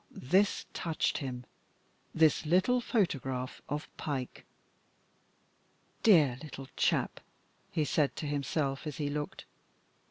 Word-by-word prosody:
this 190 +10 +1
touched 165 -3 -1
him, 125 -3 -5 0.7
this 160 -2 +4
little 185 +10 +3
photograph 135 - -1
of 150 +1 -3
Pike. 135 -4 -4 1.6
"Dear 150 - +5
little 135 -3 -8
chap," - - +1 0.5
he 155 - +1
said 145 -1 +1
to - - -4
himself 145 0 -1
as 150 - -5
he 145 -2 -1
looked. 150 0 -4
150 Hz, 105 wpm, -31 LUFS, 135-165 Hz, 1.6 s, Dear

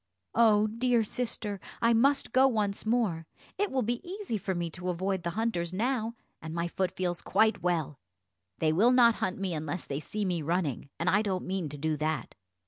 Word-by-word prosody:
"Oh, 215 -2 +5
dear 230 +2 +1
sister, 215 -3 -3 0.2
I 230 0 +4
must 275 +5 +3
go 265 +1 +6
once 210 -4 -1
more; 205 -9 +1 0.3
it 410 0 +1
will 260 -1 0
be 240 +2 -1
easy 380 - -4
for 190 -1 -2
me 170 -1 -2
to 180 +1 -5
avoid 190 +2 -1
the 170 - -2
hunters 185 -7 -1
now, 230 +2 -1 0.3
and 160 0 -6
my 170 0 0
foot 185 +1 -1
feels 175 -1 -3
quite 220 +3 +2
well; 165 -5 -1 0.6
they 155 -1 +2
will 220 +9 +5
not 240 -2 +6
hunt 185 -1 -1
me 195 -2 -2
unless 155 +2 -4
they 140 - -3
see 210 +6 -3
me 175 -3 -1
running, 155 -4 -1
and 170 - -2
I 195 +3 +4
don't 190 -4 -2
mean 185 -4 -2
to 145 - -8
do 155 +1 -1
that." 155 +1 -2
195 Hz, 200 wpm, -29 LUFS, 170-230 Hz, 0.6 s, go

